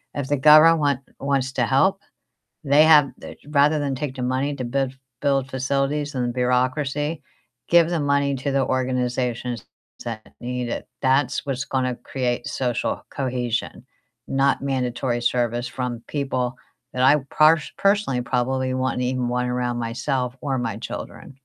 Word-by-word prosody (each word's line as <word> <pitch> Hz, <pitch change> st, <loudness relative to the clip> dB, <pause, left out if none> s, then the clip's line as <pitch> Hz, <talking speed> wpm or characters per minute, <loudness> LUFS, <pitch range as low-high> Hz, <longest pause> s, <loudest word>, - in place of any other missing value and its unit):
If 140 Hz, -2 st, -3 dB
the 145 Hz, -, +2 dB
govern 155 Hz, +3 st, +7 dB
want 140 Hz, -3 st, +1 dB, 0.2 s
wants 135 Hz, -1 st, 0 dB
to 120 Hz, -, +1 dB
help, 190 Hz, +9 st, +2 dB, 0.6 s
they 145 Hz, +2 st, +5 dB
have 150 Hz, -3 st, +6 dB
they -, -, -10 dB
Rather 150 Hz, +1 st, +3 dB
than 140 Hz, -2 st, -1 dB
take 140 Hz, -1 st, -4 dB
the 125 Hz, -, -4 dB
money 130 Hz, +3 st, -1 dB
to 130 Hz, -, -4 dB
build 135 Hz, +1 st, -1 dB, 0.3 s
build 135 Hz, -2 st, +1 dB
facilities 140 Hz, +2 st, -1 dB
and 120 Hz, -1 st, -1 dB
bureaucracy, 140 Hz, +5 st, 0 dB, 0.5 s
give 170 Hz, 0 st, +5 dB
the 170 Hz, -, 0 dB
money 140 Hz, -1 st, +1 dB
to 135 Hz, +1 st, -2 dB
the 135 Hz, -1 st, +2 dB
organizations 125 Hz, -2 st, -1 dB, 0.4 s
that 115 Hz, -2 st, -7 dB
need 125 Hz, 0 st, -3 dB
it. -, -, -4 dB, 0.2 s
That's 135 Hz, +3 st, +2 dB
what's 135 Hz, -1 st, -2 dB
gonna 130 Hz, -2 st, -1 dB
create 125 Hz, -2 st, -3 dB
social 125 Hz, -3 st, -2 dB
cohesion, 125 Hz, -3 st, -3 dB, 0.4 s
not 135 Hz, 0 st, +1 dB
mandatory 125 Hz, -2 st, -1 dB
service 120 Hz, 0 st, 0 dB
from 125 Hz, -2 st, -4 dB
people 130 Hz, -3 st, -2 dB, 0.4 s
that 125 Hz, -, -1 dB
I 135 Hz, +3 st, +6 dB, 0.2 s
parsh 155 Hz, 0 st, +5 dB
personally 200 Hz, -11 st, +2 dB
probably 130 Hz, +1 st, -1 dB
wouldn't 130 Hz, -1 st, -1 dB
even 125 Hz, -1 st, -1 dB
want 125 Hz, 0 st, -1 dB
around 125 Hz, -1 st, -1 dB
myself 120 Hz, +2 st, -2 dB
or 135 Hz, -3 st, -1 dB
my 115 Hz, -4 st, -2 dB
children. 130 Hz, -, -8 dB
130 Hz, 150 wpm, -23 LUFS, 125-140 Hz, 0.6 s, govern